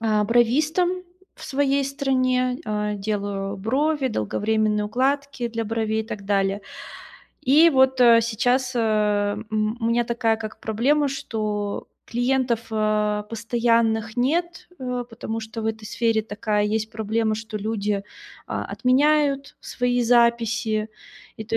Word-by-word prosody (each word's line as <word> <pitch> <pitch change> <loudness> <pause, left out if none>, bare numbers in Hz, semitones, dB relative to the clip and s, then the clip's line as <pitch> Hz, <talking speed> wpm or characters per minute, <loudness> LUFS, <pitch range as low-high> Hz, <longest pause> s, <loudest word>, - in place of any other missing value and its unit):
а, 215 -2 +2
бровистом 305 - +2 0.3
в - - -12
своей 280 -1 +1
стране, 255 -2 0
э, 210 -1 -2
делаю 200 -1 -3
брови, 270 +7 0
долговременные 210 - 0
укладки 265 +2 -1
для 230 -1 -3
бровей 220 0 -1
и 220 - -14
так 205 -4 -7
далее. 195 0 +1 0.8
И 305 +6 +6
вот, 265 -2 +3
э, 235 -1 +7
сейчас, 245 +3 0
э, - - 0 0.7
м, 215 +1 0
у - - -3
меня 235 +1 +2
такая 235 -1 0
как 215 -1 -8
проблема, 275 +7 +1
что 210 -5 -3 0.2
клиентов, 245 -1 0
а, 210 -1 +1
постоянных 230 0 +1
нет, 330 +7 -1
э, 250 -1 -3
потому 225 -1 -5
что 220 0 -7
в - - -2
этой 220 -1 -3
сфере 225 -1 0
такая 210 0 -1
есть 215 +1 -1
проблема, 220 0 -1
что 220 0 -6
люди, 210 -1 -2 0.5
а, - - -3
отменяют 280 +1 +1
свои 245 -1 -1
записи. 230 -2 +2 0.5
И 220 - -6
то 225 +1 -1
230 Hz, 135 wpm, -23 LUFS, 215-255 Hz, 0.8 s, э